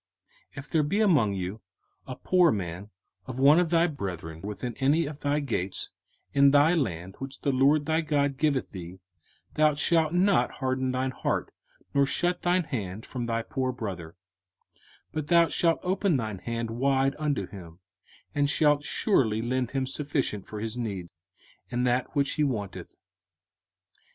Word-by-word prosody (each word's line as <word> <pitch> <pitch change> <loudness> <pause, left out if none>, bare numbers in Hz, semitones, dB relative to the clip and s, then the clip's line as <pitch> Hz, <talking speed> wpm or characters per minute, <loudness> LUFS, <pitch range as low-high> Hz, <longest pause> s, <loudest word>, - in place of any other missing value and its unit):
05:015:007 - - -21
If 135 +2 -8
there 160 - +3
be 150 +8 0
among 150 - +3
you 95 +3 -4 0.5
a 130 - -5
poor 180 +2 +3
man 95 0 -4 0.4
of 130 - -6
one 145 +5 +6
of 175 -2 +1
thy 165 0 +4
brethren 90 - -5
within 105 +5 -5
any 145 +5 +3
of 145 0 -7
thy 145 0 0
gates 110 -10 -2 0.4
in 140 0 +6
thy 145 +4 +5
land 95 - -2
which 135 0 -7
the 140 - +1
LORD 140 +3 +3
thy 160 +1 +1
God 145 -3 0
giveth 145 -4 0
thee, 90 0 -8 0.5
thou 155 -1 +3
shalt 160 +1 +2
not 185 +3 +2
harden 130 -1 -1
thine 130 +1 -1
heart, - - -2 0.4
nor 140 -1 +3
shut 175 +4 0
thine 180 +1 +2
hand 105 - -5
from 120 -2 -5
thy 115 0 -1
poor 130 +1 -2
brother: 95 -9 -6 0.9
05:015:008 - - -45
But 155 -2 -4
thou 170 0 +5
shalt 165 +1 +2
open 185 -3 +1
thine 110 -5 -4
hand 115 +1 -4
wide 135 +3 +1
unto 145 -10 -1
him, 85 -4 -11 0.6
and 145 -1 +1
shalt 150 -1 +3
surely 115 - +1
lend 125 0 -1
him 135 0 -1
sufficient 135 -6 -2
for 105 - -6
his 110 +2 -4
need, 100 -7 -4 0.6
in 120 +1 -1
that 125 +4 0
which 140 -1 +2
he 150 - 0
wanteth. 110 -9 -4
135 Hz, 165 wpm, -27 LUFS, 110-150 Hz, 0.9 s, one